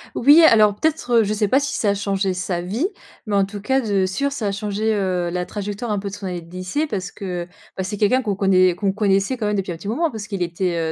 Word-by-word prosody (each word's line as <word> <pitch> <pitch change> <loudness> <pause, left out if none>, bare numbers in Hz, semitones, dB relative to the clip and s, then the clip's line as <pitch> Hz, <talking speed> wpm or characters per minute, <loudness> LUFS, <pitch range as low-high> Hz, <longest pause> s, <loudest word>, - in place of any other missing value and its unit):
Oui, 290 +7 +7
alors, 215 -8 +6
peut-être, 315 +3 -1
heu - - +2
je 210 0 -1
sais 210 0 +1
pas 260 +7 +3
si 285 0 -3
ça 210 - +1
a - - +3
changé 195 -1 -1
sa 180 -1 -2
vie, 215 - -1 0.4
mais 210 -2 -1
en 200 -1 +3
tout 205 +1 -8
cas, 265 +6 +1
de 200 -5 +1
sûr, 280 +10 -1
ça 260 -6 -4
a - - 0
changé, 210 +2 -1
heu, 185 -4 -1
la 180 0 -1
trajectoire 205 +3 -5
un 210 - 0
peu 200 0 -4
de - - -12
son 205 -1 -6
année 180 -1 -4
de 165 0 -16
lycée 185 - -2
parce 195 -10 -4
que 180 -3 -5
heu, - - -22 0.3
bah, 190 - -3
c'est 205 +2 -4
quelqu'un 235 +6 +3
qu'on 210 -5 -2
connaît 185 -2 +3
qu'on 195 +1 0
connaissait, 200 +3 +1
quand 215 -3 -2
même, 210 - 0
depuis 190 -2 -2
un - - -4
petit 185 - -9
moment 310 +10 0
parce 215 -3 -7
qu'il 195 -4 -2
était, 170 -2 -1
200 Hz, 280 wpm, -21 LUFS, 185-220 Hz, 0.4 s, Oui